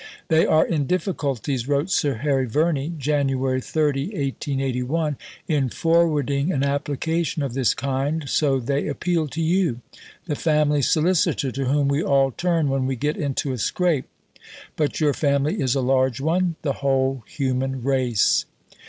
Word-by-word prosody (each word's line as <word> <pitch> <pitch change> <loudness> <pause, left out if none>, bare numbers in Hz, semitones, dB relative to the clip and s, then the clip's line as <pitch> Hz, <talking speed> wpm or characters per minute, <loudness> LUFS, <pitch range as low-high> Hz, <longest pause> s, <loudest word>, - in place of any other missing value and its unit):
"They 160 0 +4
are 155 - +4
in 150 -5 -1
difficulties," 140 - -2
wrote 145 +5 0
Sir 145 -7 +1
Harry 135 +1 0
Verney 150 +3 0
(Jan. 145 0 +1
30, 135 +2 0
1881), 140 - -2 0.3
in 140 -5 +1
forwarding 155 -1 +1
an 140 -6 0
application 145 +2 -1
of 135 -4 -3
this 130 -2 +1
kind; 140 +3 -2
"so 135 -2 +2
they 140 +3 -1
appeal 165 +2 -1
to 160 +4 -4
you 165 -7 +1 0.4
the 160 - -2
Family 150 -2 +2
Solicitor 155 -2 +1
to 135 +2 -3
whom 140 +2 +2
we 140 +2 +1
all 135 -2 +2
turn 170 +1 0
when 135 -1 0
we 135 - -1
get 145 +5 -1
into 140 -1 -2
a 125 - -5
scrape, 170 - 0 0.7
but 150 -2 -1
your 150 -3 +2
Family 140 +1 0
is 130 -1 +1
a 135 - +1
large 130 -1 +1
one 170 +4 0
the 140 -3 0
whole 135 -2 +1
human 135 -2 -2
race." 130 -5 +2
140 Hz, 155 wpm, -23 LUFS, 135-155 Hz, 0.7 s, They